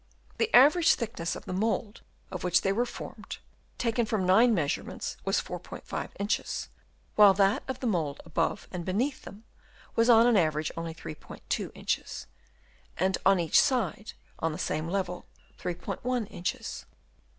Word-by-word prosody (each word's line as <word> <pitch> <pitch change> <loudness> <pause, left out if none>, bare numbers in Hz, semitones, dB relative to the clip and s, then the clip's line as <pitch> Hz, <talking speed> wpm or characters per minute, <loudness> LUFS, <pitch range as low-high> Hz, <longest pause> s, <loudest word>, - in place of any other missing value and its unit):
The 455 - +1
average 305 +6 +6
thickness 215 -8 -3
of - - -9
the - - -4
mould 220 +2 -1 0.3
of - - -5
which 180 0 +3
they 195 - +1
were 240 +4 0
formed, - - -8 0.4
taken 230 -1 0
from 210 -4 0
nine 220 +7 +6
measurements, 160 -10 -2
was - - +2
4*5 - - -6
inches; 205 +1 -2 0.5
while 205 -2 +8
that 195 +1 +3
of 265 -2 -5
the - - -3
mould 160 -10 0
above 165 0 -1
and 180 -2 -4
beneath 240 +10 -1
them 205 +2 -12 0.5
was 230 +1 +3
on 230 -1 +7
an 240 -3 +5
average 155 -3 +1
only 165 -1 -5
3*2 155 -2 -5
inches, - - -3 0.7
and 190 +2 +1
on 195 -1 +5
each 165 -2 +5
side, 230 - -1 0.3
on 165 - 0
the - - -5
same 155 +1 -2
level, 180 -1 -3 0.3
3*1 230 +7 -3
inches. 175 -1 -4
195 Hz, 150 wpm, -29 LUFS, 170-230 Hz, 0.7 s, while